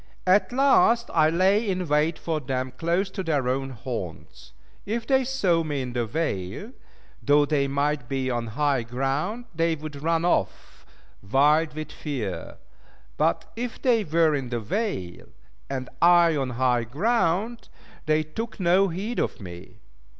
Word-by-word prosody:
At 190 Hz, +2 st, +3 dB
last 245 Hz, -3 st, +4 dB
I 155 Hz, -2 st, +4 dB
lay 195 Hz, +6 st, +2 dB
in 185 Hz, -2 st, -1 dB
wait 150 Hz, +2 st, +2 dB
for 160 Hz, -2 st, -2 dB
them 130 Hz, -2 st, -3 dB
close 170 Hz, +8 st, 0 dB
to 190 Hz, -, -4 dB
their 150 Hz, -7 st, 0 dB
own 135 Hz, +1 st, -1 dB
haunts. 115 Hz, -, -7 dB, 0.3 s
If 225 Hz, +3 st, -3 dB
they 265 Hz, 0 st, +3 dB
saw 195 Hz, -11 st, +1 dB
me 145 Hz, -4 st, -2 dB
in 125 Hz, -1 st, -6 dB
the 120 Hz, -2 st, -1 dB
vale, 150 Hz, -, -3 dB, 0.5 s
though 145 Hz, 0 st, +4 dB
they 140 Hz, -1 st, +1 dB
might 140 Hz, -2 st, -1 dB
be 135 Hz, -1 st, -1 dB
on 120 Hz, -1 st, -2 dB
high 145 Hz, -4 st, +2 dB
ground, 135 Hz, -, -2 dB
they 165 Hz, 0 st, +1 dB
would 150 Hz, -2 st, -8 dB
run 165 Hz, +1 st, +1 dB
off, 95 Hz, -, -2 dB, 0.3 s
wild 150 Hz, +9 st, +3 dB
with 155 Hz, -1 st, -6 dB
fear; 105 Hz, -, -5 dB, 0.6 s
but -, -, +1 dB
if 240 Hz, +1 st, -5 dB
they 235 Hz, -4 st, +2 dB
were 160 Hz, -2 st, +2 dB
in 135 Hz, -4 st, -2 dB
the 120 Hz, -1 st, -2 dB
vale, 110 Hz, -, -3 dB, 0.4 s
and 130 Hz, -2 st, -3 dB
I 170 Hz, -1 st, +6 dB
on 135 Hz, -3 st, -1 dB
high 125 Hz, -2 st, +2 dB
ground, 210 Hz, -, 0 dB, 0.4 s
they 155 Hz, 0 st, +3 dB
took 220 Hz, +10 st, -6 dB
no 185 Hz, +2 st, +4 dB
heed 195 Hz, +7 st, -3 dB
of -, -, -2 dB
me. 90 Hz, -2 st, -11 dB
155 Hz, 155 wpm, -25 LUFS, 130-185 Hz, 0.6 s, I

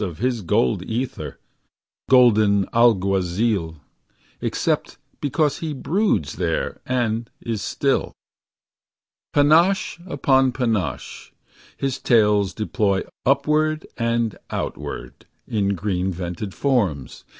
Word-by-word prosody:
Of 85 Hz, -5 st, -4 dB
his 120 Hz, -1 st, -1 dB
gold 70 Hz, -8 st, +1 dB
ether, 120 Hz, +3 st, -4 dB, 0.7 s
golden 110 Hz, -6 st, +5 dB
alguazil. 95 Hz, -4 st, +2 dB, 0.7 s
Except -, -, -1 dB, 0.2 s
because 145 Hz, 0 st, 0 dB
he 160 Hz, -2 st, -3 dB
broods 145 Hz, -, 0 dB
there -, -, -2 dB
and 120 Hz, -2 st, -1 dB
is 115 Hz, -3 st, -4 dB
still. -, -, 0 dB, 1.2 s
Panache 170 Hz, +7 st, +3 dB
upon 135 Hz, -4 st, +2 dB
panache, 115 Hz, -8 st, -2 dB, 0.5 s
his 135 Hz, -1 st, -2 dB
tails 105 Hz, -5 st, +3 dB
deploy 105 Hz, -3 st, 0 dB, 0.2 s
Upward 150 Hz, +3 st, +2 dB
and 115 Hz, -2 st, -1 dB
outward, -, -, -6 dB, 0.2 s
in 100 Hz, -2 st, 0 dB
green 95 Hz, -1 st, -1 dB
vented 90 Hz, +2 st, -5 dB
forms. 100 Hz, -, -1 dB
115 Hz, 95 wpm, -22 LUFS, 100-135 Hz, 1.2 s, golden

